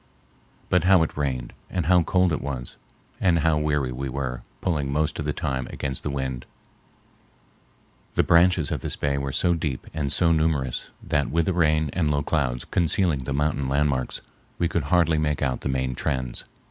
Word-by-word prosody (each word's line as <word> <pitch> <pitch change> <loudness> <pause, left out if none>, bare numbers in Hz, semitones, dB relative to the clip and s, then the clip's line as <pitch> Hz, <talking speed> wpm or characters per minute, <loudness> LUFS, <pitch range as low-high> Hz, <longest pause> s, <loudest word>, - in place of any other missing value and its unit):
But 90 -2 +3
how 95 -3 +6
it 80 - -4
rained, 65 -4 -2 0.2
and 90 -3 -2
how 90 +1 +5
cold 90 +1 +2
it - - -1
was, 65 -3 -5 0.4
and 90 -3 +3
how 80 -1 +2
weary 75 -4 0
we 65 +2 -4
were 65 -2 -3 0.2
pulling 75 -6 -1
most 75 +2 0
of 75 - -2
the 75 - 0
time 65 -2 -2
against 65 -2 -3
the - - -3
wind! 65 -2 -3 1.7
The - - +4
branches 85 -3 +4
of - - -2
this - - -4
bay 70 -1 -1
are 70 0 -2
so 85 +6 +2
deep 75 -6 -3
and 70 -3 -2
so 85 -2 +3
numerous 80 -6 0
that, 70 -1 0
with 80 +4 +1
the 95 - +1
rain 80 -3 +2
and 80 -4 +1
low 70 -1 +1
clouds 65 -6 -1
concealing 85 -2 +2
the 65 +2 -3
mountain 70 -2 0
landmarks, 70 -2 0 0.4
we 85 - +1
could 85 -3 -1
hardly 80 0 +3
make 75 -2 0
out 65 -1 -1
the - - -2
main 65 -1 -1
trends. 65 0 -2
75 Hz, 185 wpm, -25 LUFS, 65-80 Hz, 1.7 s, how